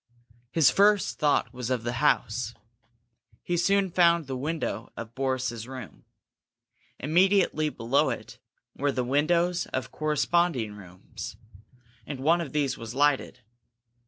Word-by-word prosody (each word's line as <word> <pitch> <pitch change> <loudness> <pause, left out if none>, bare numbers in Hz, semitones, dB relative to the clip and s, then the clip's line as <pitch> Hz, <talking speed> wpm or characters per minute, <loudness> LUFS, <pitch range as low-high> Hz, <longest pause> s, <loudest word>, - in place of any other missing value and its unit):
His 160 +1 +4
first 205 0 +3
thought 145 -5 +2
was 125 -1 -5
of 125 -3 -1
the 120 0 -3
house. 115 +1 +1 0.9
He 175 - -1
soon 195 +2 +2
found 170 -2 +4
the 135 -1 -4
window 130 -5 -3
of 115 0 -7
Boris's 130 -3 -2
room. 130 - -10 0.9
Immediately 175 0 +2
below 125 0 +1
it - - -6 0.4
were 145 +1 0
the 125 - -1
windows 170 +7 +1
of 130 - -4
corresponding 155 -5 0
rooms, 95 -1 -10 0.7
and 140 -3 -5
one 165 +6 +3
of 150 -6 -5
these 145 -2 -1
was 115 +1 -7
lighted. 140 -3 +1
140 Hz, 130 wpm, -27 LUFS, 125-170 Hz, 0.9 s, His